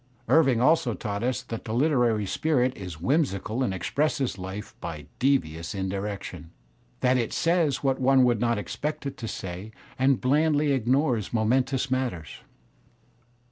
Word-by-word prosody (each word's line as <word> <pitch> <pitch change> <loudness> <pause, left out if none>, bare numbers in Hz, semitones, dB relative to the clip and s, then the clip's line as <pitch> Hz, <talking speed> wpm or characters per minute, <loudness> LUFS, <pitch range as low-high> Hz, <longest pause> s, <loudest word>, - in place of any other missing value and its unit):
Irving 135 -7 +4
also 125 -3 +3
taught 100 -2 -4
us 125 +1 -1
that 115 -3 -6
the 110 - -4
Uteraiy 120 -6 +2
spirit 130 0 +1
is 90 -6 -8
whimsical 125 - 0
and 125 - +1
expresses 135 - -1
life 95 +3 -6
by - - -6
devious 90 - 0
indirections, 95 -2 -4 0.5
that 130 0 +3
it 115 - -1
says 165 -6 +1
what 135 -1 +1
one 130 0 +5
would 120 -3 +3
not 120 -1 +2
expect 120 +10 -4
it 140 - -4
to 115 - -5
say 95 0 -6 0.3
and 130 -1 +3
blandly 150 +2 +2
ignores 130 -3 +1
momentous 130 +4 +1
matters. 125 - -2
125 Hz, 140 wpm, -26 LUFS, 105-135 Hz, 0.5 s, one